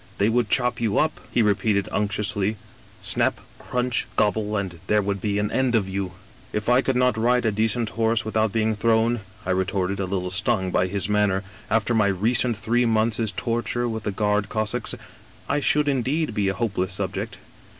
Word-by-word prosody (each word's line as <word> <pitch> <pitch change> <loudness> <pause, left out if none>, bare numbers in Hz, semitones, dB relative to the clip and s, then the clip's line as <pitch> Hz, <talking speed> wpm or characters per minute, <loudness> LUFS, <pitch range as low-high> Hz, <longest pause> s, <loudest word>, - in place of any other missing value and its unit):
They 100 +2 +3
would 120 -1 +1
chop 125 -2 +1
you 110 -3 +1
up,' 155 0 +1
he 120 - +3
repeated 100 -1 +1
unctuously, 105 0 -1 0.3
' - - -25
snap, - - +1 0.2
crunch, 125 -1 -1
gobble, 105 0 +1
and 95 -4 -4
there 105 - +3
would 100 -1 -2
be 105 -1 0
an 105 0 0
end 130 -2 +1
of 105 -4 +2
you! 95 -1 -3
' - - -25
" - - -25
* - - -25
If 105 - -4
I 125 +1 +5
could 135 -1 0
not 125 -3 +2
ride 125 +2 +2
a 110 - +3
decent 110 +2 0
horse 115 +3 +1
without 110 -1 +1
being 110 0 +1
thrown,' 115 +2 +2 0.3
I 95 - 0
retorted, 95 +1 0
a 95 - 0
little 90 -1 -2
stung 95 -1 0
by 90 - +2
his 100 +1 0
manner, 105 -2 +2 0.3
'after 110 +2 +1
my 105 -3 +3
recent 115 +4 +2
three 120 +2 +1
months' 110 -1 +1
torture 120 +1 -1
with 110 -1 -3
the 105 - -2
Guard 105 0 0
Cossacks, 110 -2 -1 0.5
I 145 - +1
should 150 +1 +2
indeed 140 +1 0
be 105 -2 0
a 95 - 0
hopeless 95 -2 -1
subject. - - -3
110 Hz, 200 wpm, -24 LUFS, 100-120 Hz, 0.5 s, I